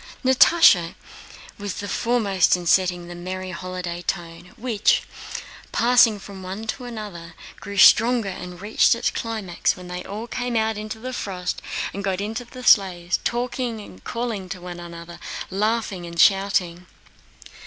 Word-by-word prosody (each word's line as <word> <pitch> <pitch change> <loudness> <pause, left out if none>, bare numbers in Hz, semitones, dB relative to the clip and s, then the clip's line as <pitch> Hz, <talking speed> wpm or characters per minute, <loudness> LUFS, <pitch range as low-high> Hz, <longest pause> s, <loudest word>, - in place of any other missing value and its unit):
Natásha 260 - +6 0.6
was 205 -1 -4
foremost 205 -3 +2
in 175 - -7
setting 175 0 +2
a - - -5
merry 185 +1 -5
holiday 180 -1 -5
tone, 175 0 -5
which, 225 -3 +2 0.7
passing 235 -2 +5
from 195 -1 -10
one 190 +4 -6
to 245 +3 -4
another, 200 -8 -8 0.2
grew 200 0 -7
stronger 230 +3 +6
and 180 -1 -8
reached 210 +2 +3
its 235 - 0
climax 215 -6 -1
when 180 -1 -10
they 180 0 -5
all 210 +3 -6
came 245 0 -3
out 220 0 +1
into 215 +1 -6
the 255 +3 -6
frost 180 -6 -4 0.3
and 200 - -5
got 190 -1 -1
into 220 +4 -3
the 250 +1 -11
sleighs, 180 -6 +4
talking, 240 - -3
calling 230 -6 -4
to 185 - -5
one 175 0 -8
another, 170 0 -9 0.3
laughing, 205 -3 -1
and 170 0 -7
shouting. 180 -2 +3
195 Hz, 145 wpm, -23 LUFS, 180-225 Hz, 0.7 s, Natásha